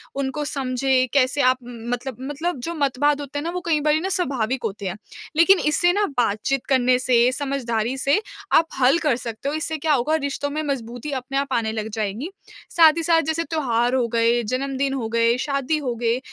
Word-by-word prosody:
उनको 275 +2 -2
समझें, 265 -2 0
कैसे 280 +1 +2
आप 255 0 +4
उम, 245 - -10 0.2
मतलब 245 0 -4
मतलब 290 +3 -3
जो 335 - -3
मतवाद 290 0 +1
होते 290 0 -5
हैं - - -5
ना 335 - -2
वो 360 +1 -4
कई 320 -3 +2
बारी 300 +1 +2
ना 375 +4 -3
स्वाभाविक 265 - -1
होते 205 -2 -4
हैं। 185 - -3 0.4
लेकिन 350 +4 +6
इससे 350 +4 +3
ना 410 +2 +2
बातचीत 245 +3 0
करने 255 -2 +3
से, 250 -1 +3
समझदारी 260 -3 -2
से 280 +8 +2 0.3
आप 325 +1 +5
हल 265 +4 +5
कर 300 -7 +1
सकते 235 +2 -5
हो, 295 - -2
इससे 315 0 -2
क्या 310 +1 +1
होगा 285 +4 +1
रिश्तों 285 -1 -2
में 300 +2 -3
मजबूती 250 -1 -4
अपने 270 0 -3
आप 275 -1 -1
आने 225 -2 0
लग 220 0 -4
जाएगी। 215 - -3 0.5
साथ 320 -2 +7
ही 330 - -1
साथ 330 0 +4
जैसे 320 +1 -1
त्योहार 245 -7 0
हो 250 -2 +1
गए, 230 +1 +3
जन्मदिन 270 +3 -1
हो 250 -5 -2
गए, 230 +1 +2
शादी 275 +2 -1
हो 260 -5 -3
गए 235 +1 +2
270 Hz, 205 wpm, -22 LUFS, 245-300 Hz, 0.5 s, साथ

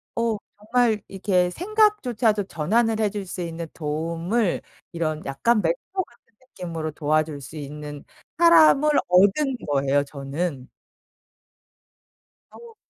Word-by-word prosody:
어 230 -2 0 0.2
정말 220 0 +1
이렇게 185 -2 +1
생각조차도 260 - +1
전환을 220 +7 0
해줄 205 -2 -1
수 180 0 -6
있는 165 -1 -5
도움을 165 +7 -1 0.3
이런 155 -2 -3
약간 210 +12 +1
멘토 170 0 0 0.2
같은 235 -5 -26
느낌으로 170 -10 -6
도와줄 155 -1 -1
수 140 +4 -10
있는 145 0 -7 0.3
사람을 320 -3 +6 0.2
얻은 205 +10 +3
거예요 140 0 +2
저는. 140 0 -5 1.8
어. 470 -1 -14
180 Hz, 235 characters per minute, -24 LUFS, 155-230 Hz, 1.8 s, 사람을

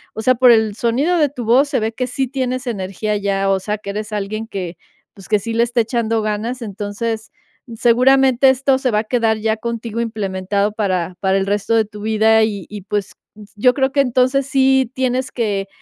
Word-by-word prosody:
o 220 - -5
sea, 255 - +4
por 250 0 +5
el 220 -3 +4
sonido 265 +11 +1
de 300 -3 +3
tu 250 -4 -7
voz 260 +6 +4
se 280 - 0
ve 220 0 -1
que 250 +2 -3
sí 265 +2 -1
tienes 255 0 -3
energía 210 -1 -3
ya, 195 -1 0
o 195 - +1
sea, 210 +2 -3
que 200 -1 -7
eres 210 +1 -5
alguien 210 +2 -4
que, 185 -5 -5 0.4
pues, 195 - -14
que 210 - +4
sí 225 +3 -5
le 230 - +2
está 240 0 +2
echando 225 -1 -1
ganas, 225 +4 -3
entonces, 215 +2 -4 0.4
seguramente 260 +2 +4
esto 265 +1 +2
se 265 - 0
va 210 - +2
a - - -1
quedar 225 -1 +1
ya 220 0 0
contigo 230 0 -4
implementado 200 -2 -2
para 185 -5 -2
para 190 0 +1
el 195 - 0
resto 205 +3 0
de 220 -1 +3
tu 210 0 -11
vida, 220 +1 +3
y 205 -4 -2
y, 210 -1 -7
pues, 205 0 -3 0.4
yo 250 +4 +3
creo 265 -1 0
que 285 - +4
entonces 260 +1 +1
sí 265 -2 +2
tienes 260 0 -1
que, 205 -5 -2
225 Hz, 210 wpm, -18 LUFS, 205-255 Hz, 0.4 s, por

